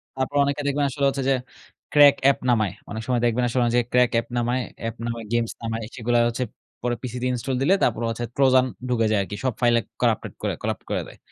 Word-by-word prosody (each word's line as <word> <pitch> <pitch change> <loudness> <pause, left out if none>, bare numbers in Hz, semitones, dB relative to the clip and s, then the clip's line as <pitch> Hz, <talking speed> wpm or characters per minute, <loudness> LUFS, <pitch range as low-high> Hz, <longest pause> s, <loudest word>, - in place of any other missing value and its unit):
তারপর 130 +2 -2
অনেকে 140 +1 -1
দেখবেন 145 +1 +1
আসলে 140 +1 -1
হচ্ছে 135 0 -3
যে 135 - +4 0.6
crack 145 -1 +8
অ্যাপ 140 0 +5
নামায়। 110 -6 +2 0.2
অনেক 110 +1 -4
সময় 125 -2 +1
দেখবেন 120 +1 +1
আসলে 125 +1 0
অনেক 120 0 +1
জায়গায় 120 -1 +1
crack 125 -1 +4
অ্যাপ 115 - +1
নামায়, 120 +2 0 0.2
অ্যাপ 115 0 -3
নামায়, 115 -1 -4
গেমস 120 -1 +1
নামায়। 115 0 -3
সেগুলা 120 0 +1
হচ্ছে 120 +2 -2 0.4
পরে 120 0 0
পিসি 125 -1 -5
দিয়ে 125 0 0
ইনস্টল 125 +2 -2
দিলে 155 +8 +4
তারপরে 115 -1 +1
হচ্ছে 115 +1 -3
Trojan 130 -2 +5 0.2
ঢুকে 115 -2 +2
যায় 105 - +3
আরকি। 100 +1 -5
সব 130 -2 +1
ফাইলে 120 -1 +4 0.2
করাপ্টেড - - +1
করে - - -1
করাপ্ট - - -2
করে - - 0
দেয়। - - -14
120 Hz, 225 wpm, -24 LUFS, 115-130 Hz, 0.6 s, crack